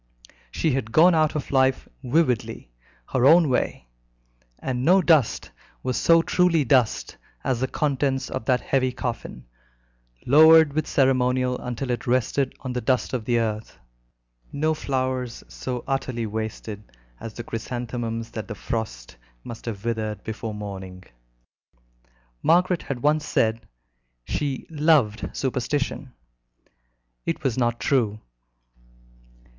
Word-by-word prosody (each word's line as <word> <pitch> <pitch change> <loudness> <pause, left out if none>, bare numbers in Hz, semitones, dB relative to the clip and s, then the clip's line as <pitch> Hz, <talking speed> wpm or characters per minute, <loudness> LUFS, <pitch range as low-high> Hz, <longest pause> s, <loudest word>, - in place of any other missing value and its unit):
She 155 - 0
had 125 -4 -2
gone 170 +6 +6
out 155 -2 +2
of 150 - -4
life 130 -1 +2 0.2
vividly, 125 - 0 0.4
her 125 - +2
own 160 +3 +6
way, 125 - -1 0.7
and 125 -1 -3
no 180 +6 +5
dust 160 - +2 0.3
was 130 -1 -1
so 165 +6 +4
truly 175 -4 +2
dust 125 -2 +1 0.3
as 125 - 0
the 130 - 0
contents 135 -2 -1
of - - -5
that 125 +1 +2
heavy 130 -2 +1
coffin, 115 - -5 0.8
lowered 160 +2 +7
with 155 +1 -1
ceremonial 130 -1 +2
until 125 +1 -4
it 120 - -3
rested 130 +2 0
on 130 -2 -4
the 125 - -2
dust 130 +2 0
of 120 -4 -2
the 120 0 +2
earth, 110 -1 -3 0.7
no 155 +2 0
flowers 130 -4 -2
so 125 -2 -5
utterly 130 -4 -2
wasted 110 -1 -5 0.4
as 110 -2 -8
the 120 - -6
chrysanthemums 115 0 -4
that 110 - -6
the 105 - -6
frost - - -5 0.3
must 115 - -9
have 105 -2 -5
withered 110 -3 -2
before 110 -1 -5
morning. 95 -3 -7 1.4
Margaret 180 +1 +3
had 125 -3 -5
once 150 +1 +3
said 110 -4 0 0.6
she 140 - -3
"loved 150 -8 +2
superstition." 135 +1 -2 1.1
It - - -3
was 130 -4 0
not 120 -2 0
true. 110 -6 +1
125 Hz, 130 wpm, -24 LUFS, 115-140 Hz, 1.4 s, lowered